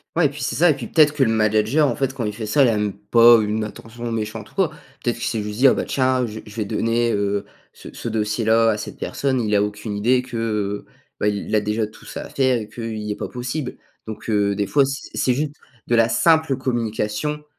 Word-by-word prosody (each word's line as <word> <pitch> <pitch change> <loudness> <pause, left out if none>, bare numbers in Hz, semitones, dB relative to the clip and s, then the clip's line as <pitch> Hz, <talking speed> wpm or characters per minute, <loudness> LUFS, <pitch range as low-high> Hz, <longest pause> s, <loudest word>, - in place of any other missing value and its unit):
Ouais 165 -1 +3
et - - +4
puis, 145 0 -9
c'est 135 - -2
ça 175 +1 +5
et - - 0
puis 120 -5 -7
peut-être 150 -2 +4
que 145 -2 +2
le 120 - +2
manager, 110 +7 +3
en 120 - -1
fait, 135 -1 -1
quand 120 - -3
il 105 - -2
fait 110 0 -6
ça, 140 +7 +4
il - - +5
a 115 - +1
même 105 -1 -1
pas 115 +3 +6
une 105 +1 -1
attention 115 +3 -7
méchante 110 -1 -4
ou - - -25
quoi. 190 -5 +2 0.3
Peut-être 120 -1 0
qu'il 115 - -4
s'est 110 -3 -1
juste 105 +1 -6
dit: 135 - +7
«Ah - - +5
bah, - - -2
tiens, 130 -1 +1
je 110 -1 -7
vais - - -12
je 105 - -12
vais 110 -2 -2
donner, 115 +3 0
heu, 100 0 -1 0.3
ce - - -12
ce 115 - -5
dossier 105 0 -1
là 115 +1 +4
à 105 - -1
cette - - -7
personne». 135 -2 -1
Il 105 -2 -1
a 100 - +4
aucune 105 +1 -3
idée 125 +5 +2
que, 110 -4 -2 0.4
bah, - - +1
il 105 0 -2
a 110 - +4
déjà 105 +1 -1
tout 110 +1 -14
ça - - -6
à - - -10
faire 130 -2 +2
et 105 - -7
qu'heu, 115 0 -6
il 105 -1 -4
est - - -2
pas - - -5
possible. 125 +2 -4 0.3
Donc 110 - -7
heu, 100 -1 +2
des 100 0 0
fois, 140 +8 +3
c'est 135 0 -5
c'est 125 - +2
juste 145 +1 -2 0.3
de 120 - +1
la 115 0 +4
simple 160 +2 +3
communication 120 +3 -2
115 Hz, 265 wpm, -21 LUFS, 105-130 Hz, 0.4 s, dit